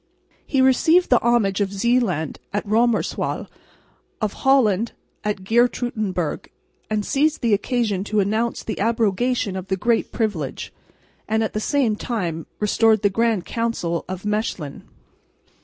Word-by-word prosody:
He 270 -3 +2
received 320 +7 +4
the 245 - +5
homage 220 -5 +2
of 195 -1 0
Zeeland 200 - 0
at 205 +2 -2
Roemerswaal, 225 +2 0 0.7
of 215 -3 -1
Holland 235 -6 +2 0.3
at 205 -2 -2
Geertruidenburg, 215 -6 0 0.4
and 210 -1 -1
seized 300 +3 +1
the 230 -4 +2
occasion 210 -2 0
to 215 0 0
announce 220 +4 0
the 220 - -4
abrogation 225 0 +1
of 190 0 -5
the 190 - -1
Great 235 +3 +1
Privilege, 190 - -3 0.5
and 220 +1 +1
at 220 - -3
the 215 - -1
same 245 -2 +1
time 175 -9 -3
restored 220 0 +3
the 205 - +3
Grand 225 -3 +1
Council 230 -8 -2
at 185 +1 -6
Mechlin. 210 -8 -2
215 Hz, 135 wpm, -22 LUFS, 195-235 Hz, 0.7 s, the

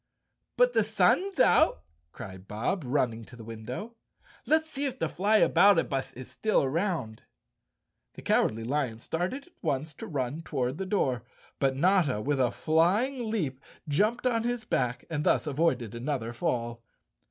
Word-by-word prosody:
"But - - +4
the - - +4
sun's 390 +1 +2
out," 315 - +4 0.3
cried 95 0 -10
Bob, 120 - -2
running 125 -4 0
to 125 - -14
the 115 -2 -11
win¬ 110 -1 -9
dow. 205 - -5 0.6
"Let's 315 0 +3
see 285 -2 -4
if 265 -2 -3
the - - -1
Flyaboutabus 190 -7 +3
is 130 +1 -9
still 215 -7 +1
around." 140 - -2 0.9
The - - -10
Cowardly 110 +1 +2
Lion 130 -2 -1
started 180 - -3
at 360 - -24
once 145 +3 -2
to - - -8
run 140 +1 -3
toward 135 -2 -2
the 190 - -3
door, 130 - 0 0.4
but 135 -1 +2
Notta, 170 - +3
with 140 +5 -1
a 125 -2 +3
flying 205 - +1
leap 155 -12 -2 0.3
jumped 210 - +1
on 235 -2 +2
his 240 -1 -2
back 125 - -1
and 150 -3 -2
thus - - +2
avoided 135 -7 0
another 120 -1 -3
fall. 120 0 -2
150 Hz, 155 wpm, -28 LUFS, 125-205 Hz, 0.9 s, But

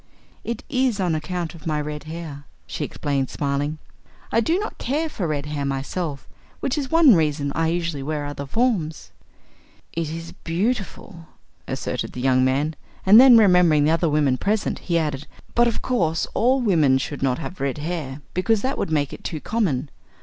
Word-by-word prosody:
"It 235 0 -4
is 255 -5 +1
on 180 -3 +1
account 165 +1 -3
of 165 -1 -10
my 155 -1 0
red 150 0 -5
hair," 155 -3 -7 0.2
she - - -4
explained 140 -2 -2
smiling. 145 +2 -2 0.5
"I 230 - +3
do 325 +10 +2
not 420 +2 -5
care 300 +5 -1
for 185 - -3
red 145 -2 -2
hair 150 -1 -3
myself, 140 +2 -3 0.3
which 270 - -1
is 280 -4 -3
one 325 -6 +7
reason 150 -4 +1
I 165 0 +1
usually 170 -3 -1
wear 145 +1 -3
other 140 -1 -6
forms." 195 - -1 0.8
"It 165 -2 -2
is 165 +1 -6
beautiful," 185 -2 -3 0.4
asserted - - -3
the - - -6
young 130 0 +3
man; 140 +4 +1 0.3
and 210 +5 +9
then 255 -3 +9
remembering 180 -8 +5
the 150 - +3
other 165 0 +2
women 145 -4 +2
present 210 +1 0
he 170 -2 0
added: 150 -4 -2 0.3
"But, 240 0 +4
of 230 - -2
course, 165 -10 +1
all 255 +3 +3
women 160 - +4
should 140 +2 -4
not 130 -2 +1
have 180 +1 -7
red 135 -1 -1
hair, 150 -3 -4
because 200 +4 +1
that 265 +2 -1
would - - -1
make 145 -3 0
it - - -10
too 160 - -4
common. 155 - -1
160 Hz, 180 wpm, -23 LUFS, 145-205 Hz, 0.8 s, and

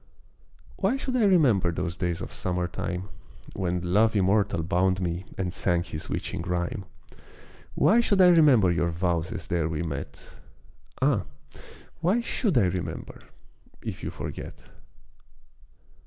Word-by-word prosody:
Why 205 +7 +1
should 260 -2 -3
I 235 -4 +3
remember 125 - +4
those 85 0 -3
days 90 -3 -2
of - - -6
Summer 90 -1 -2
time 90 +2 -4 0.5
When 90 -2 -1
Love 110 +2 +4
immortal 100 -3 +2
bound 95 +2 +1
me, 90 0 -3
and 90 -2 -2
sang 85 -3 0
his 75 -3 -7
witching - - -3
rhyme. 90 +5 -2 0.9
Why 225 - +4
should 205 -4 +2
I 180 -1 +8
remember 140 - +6
your 85 0 +1
vows 85 0 -1
as 100 -7 -5
there 85 -3 0
we 80 +1 -2
met? 70 -4 -6 0.8
Ah, - - +2 0.7
why 185 +8 +2
should 220 - 0
I 100 - +5
remember 90 -1 -4 0.6
if - - -5
you - - -3
forget! - - -7
95 Hz, 140 wpm, -26 LUFS, 85-125 Hz, 0.9 s, I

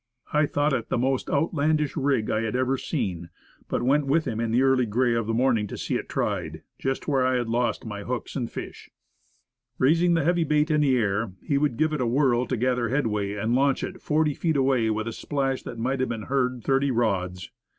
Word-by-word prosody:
I 150 0 +3
thought 145 0 +1
it 120 -4 -2
the - - 0
most 130 +2 0
outlandish 150 -1 +1
rig 140 -7 0
I 110 - +1
had 115 +1 -2
ever 130 +1 +1
seen, 90 - -3 0.4
but - - -1
went 140 +3 +2
with 155 +4 +2
him 110 - -3
in 115 -1 -1
the 120 +4 +3
early 130 -2 +3
gray 120 +3 +1
of 115 -2 -1
the 115 - 0
morning 120 -4 +2
to - - -7
see - - -3
it - - -2
tried, - - -2 0.2
just 135 0 -2
where 135 -3 +2
I 130 0 +2
had 120 -2 -1
lost 120 +2 -1
my 105 -2 -5
hooks 125 +3 -4
and 120 -4 -2
fish. - - -8 0.9
Raising 170 +6 +3
the 165 - +1
heavy 175 +2 +2
bait 150 +1 +1
in 150 0 +3
the 135 -3 +3
air, 100 -2 0
he 140 -1 +1
would 140 -5 0
give 155 +2 +1
it 150 - -1
a 125 - +1
whirl 125 -1 +2
to 130 - -1
gather 125 0 0
headway, 105 -7 0
and 110 +3 -1
launch 135 +1 +2
it - - -6
forty 150 -1 +1
feet 160 0 0
away 130 -4 +2
with 110 +1 -1
a 115 - -3
splash 135 +1 -2
that 120 - -8
might 130 +4 -1
have 130 - 0
been 115 -2 -4
heard 125 -3 0
thirty 135 +3 +2
rods. 95 -7 -1
130 Hz, 225 wpm, -25 LUFS, 115-145 Hz, 0.9 s, I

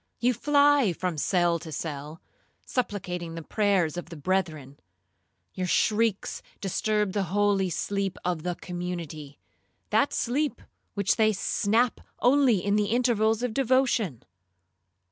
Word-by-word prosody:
You 245 +2 +2
fly 285 -4 +4
from 180 0 -3
cell 175 0 +2
to 160 0 -9
cell, 150 +1 -6 0.4
supplicating 180 -8 -3
the 165 - -6
prayers 195 -4 +1
of 175 - -6
the 170 - -8
brethren. 155 -5 -2 0.7
Your 185 -1 -3
shrieks 215 +2 +1 0.2
disturb 210 0 0
the 205 - 0
holy 200 -1 +2
sleep 195 +2 -2
of 175 -3 -1
the 180 +1 -2
community—that 175 - -4
sleep 280 +5 -1 0.4
which 200 +2 +1
they 215 -1 +4
snatch 225 +4 +1 0.2
only 250 -7 +3
in 205 +1 +2
the 210 - +2
intervals 225 -1 +2
of 245 -3 -1
devotion. 245 - +1
200 Hz, 125 wpm, -27 LUFS, 175-225 Hz, 0.7 s, fly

